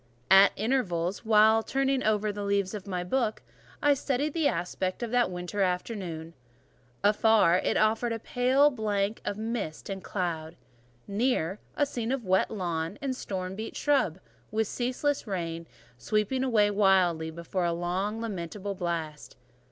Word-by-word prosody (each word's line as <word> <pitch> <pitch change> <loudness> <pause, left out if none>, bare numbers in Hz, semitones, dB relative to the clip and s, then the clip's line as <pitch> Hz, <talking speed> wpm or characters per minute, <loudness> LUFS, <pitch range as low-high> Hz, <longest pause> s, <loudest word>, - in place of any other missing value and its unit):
At 195 +1 +8
intervals, 200 -6 -1
while 220 0 +5
turning 270 +2 0
over 215 -2 +1
the 205 0 -5
leaves 200 -1 0
of 205 -2 -7
my 180 -2 -2
book, 220 +3 -1 0.4
I 290 0 +6
studied 280 +1 -1
the 320 -3 +2
aspect 185 +2 -2
of 235 - -4
that 245 -1 +3
winter 180 +3 -4
afternoon. 180 -3 -2 0.7
Afar, 205 -4 +4
it - - +1
offered 220 +2 +2
a 230 - -1
pale 255 +5 +3
blank 210 -3 -1
of 205 - -2
mist 220 -6 -4
and 190 -1 -5
cloud; 170 -4 -3 0.5
near 205 -3 0 0.2
a 290 - +3
scene 240 -4 -3
of 265 -4 -2
wet 190 0 +2
lawn 170 -5 -3
and 275 -3 -2
storm 190 -5 -4
beat 220 +2 -6
shrub, 270 - +1 0.3
with 220 +1 0
ceaseless 255 +4 -1
rain 170 -4 -4 0.3
sweeping 215 - 0
away 215 -5 +3
wildly 185 -5 +3
before 170 +2 -3
a 170 - +1
long 175 +4 -1
and 225 - -5
lamentable 200 -1 -4
blast. 165 -5 -4
205 Hz, 150 wpm, -28 LUFS, 180-230 Hz, 0.7 s, At